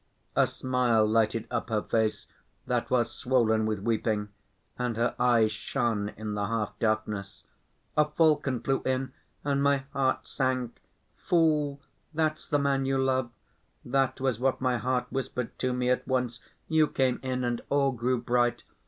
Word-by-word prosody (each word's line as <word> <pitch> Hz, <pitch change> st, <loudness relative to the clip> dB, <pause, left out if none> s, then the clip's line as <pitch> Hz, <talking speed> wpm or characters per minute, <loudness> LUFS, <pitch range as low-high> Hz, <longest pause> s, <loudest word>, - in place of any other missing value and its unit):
A -, -, +4 dB
smile 125 Hz, -4 st, +2 dB
lighted 110 Hz, +1 st, +1 dB
up 120 Hz, -1 st, -2 dB
her 110 Hz, -2 st, 0 dB
face 110 Hz, -1 st, 0 dB, 0.4 s
that 125 Hz, -1 st, -1 dB
was 120 Hz, -2 st, +2 dB
swollen 110 Hz, -4 st, +2 dB
with 110 Hz, -1 st, 0 dB
weeping, 105 Hz, 0 st, -1 dB, 0.5 s
and 125 Hz, -2 st, -2 dB
her 120 Hz, +1 st, +1 dB
eyes 115 Hz, -3 st, +4 dB
shone 105 Hz, 0 st, -1 dB
in 105 Hz, 0 st, -4 dB
the 100 Hz, -1 st, -1 dB
half 105 Hz, -2 st, -2 dB
darkness. 105 Hz, -2 st, -2 dB, 0.5 s
"A 150 Hz, -, +5 dB
falcon 150 Hz, -5 st, +2 dB
flew 135 Hz, 0 st, 0 dB
in, 130 Hz, 0 st, -1 dB, 0.3 s
and 140 Hz, -1 st, +1 dB
my 140 Hz, -1 st, +2 dB
heart 130 Hz, -1 st, +1 dB
sank. 130 Hz, -3 st, -2 dB, 0.3 s
'Fool! 150 Hz, -4 st, +1 dB, 0.3 s
that's 155 Hz, -1 st, 0 dB
the 145 Hz, -, +2 dB
man 140 Hz, -1 st, +1 dB
you 135 Hz, 0 st, +1 dB
love!' 130 Hz, -2 st, +1 dB, 0.6 s
That 135 Hz, +1 st, +1 dB
was 130 Hz, -4 st, 0 dB
what 130 Hz, +1 st, +1 dB
my 125 Hz, -2 st, +1 dB
heart 125 Hz, 0 st, 0 dB
whispered 125 Hz, -2 st, -3 dB
to 130 Hz, -, 0 dB
me 125 Hz, 0 st, +1 dB
at 125 Hz, -, 0 dB
once. 125 Hz, -2 st, -1 dB, 0.3 s
You 160 Hz, -1 st, +4 dB
came 130 Hz, -3 st, +1 dB
in 130 Hz, -1 st, -2 dB
and 120 Hz, -1 st, -1 dB
all 140 Hz, -1 st, +3 dB
grew 125 Hz, 0 st, 0 dB
bright. 120 Hz, 0 st, +1 dB
125 Hz, 160 wpm, -28 LUFS, 115-135 Hz, 0.6 s, A